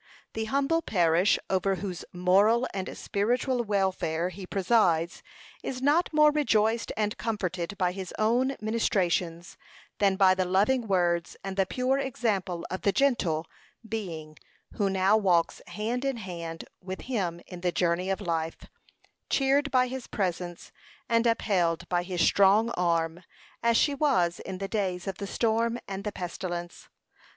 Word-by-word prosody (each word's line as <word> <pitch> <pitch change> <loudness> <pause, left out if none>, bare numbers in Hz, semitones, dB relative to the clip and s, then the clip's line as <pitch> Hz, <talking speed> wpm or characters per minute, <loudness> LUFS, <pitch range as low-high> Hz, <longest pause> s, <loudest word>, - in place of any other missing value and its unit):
The 220 0 -2
humble 280 +7 +1
parish 175 - +3
over 190 +1 +1
whose 185 -3 -5
moral 200 +7 +3
and 190 -1 -5
spiritual 240 +4 0
welfare 190 -5 0
he 185 +1 -9
presides 180 -4 +2 0.4
is 255 - -4
not 290 +6 +2
more 300 -1 +5
rejoiced 230 -6 +1
and 210 -1 0
comforted 195 -4 -3
by 180 -2 +1
his 190 -1 -6
own 245 +5 +2
ministrations 180 -6 -1 0.4
than 195 -2 +3
by 190 -1 +5
the 185 0 0
loving 210 +7 +2
words 175 -3 +1
and 195 0 -4
the 195 -1 +1
pure 260 +4 0
example 215 -10 -2
of 185 - -3
the 200 - +2
gentle 195 - +1 0.4
being 165 -8 -6 0.3
who 200 -3 0
now 190 +2 +3
walks 180 -5 +2
hand 235 +4 -3
in 270 -2 -1
hand 170 -5 -6 0.2
with 190 0 -6
him 190 -9 -2
in 180 -2 -10
the 180 -1 +1
journey 175 +2 0
of 195 +2 -1
life, 165 -3 -2 0.7
cheered 275 +1 +2
by 255 -2 +3
his 255 0 -6
presence 180 -3 -3 0.4
and 230 0 +3
upheld 185 -7 +1
by 175 -1 +1
his 175 -2 0
strong 205 +4 +4
arm, 170 -2 0 0.4
as 235 0 +3
she 290 - +3
was 225 - +1
in 190 -1 -6
the 195 +1 -4
days 190 -4 -2
of 195 -2 -5
the 200 - -4
storm 230 +2 +1
and 195 0 -5
the 210 - -1
pestilence. 175 -1 -6
195 Hz, 150 wpm, -28 LUFS, 180-230 Hz, 0.7 s, more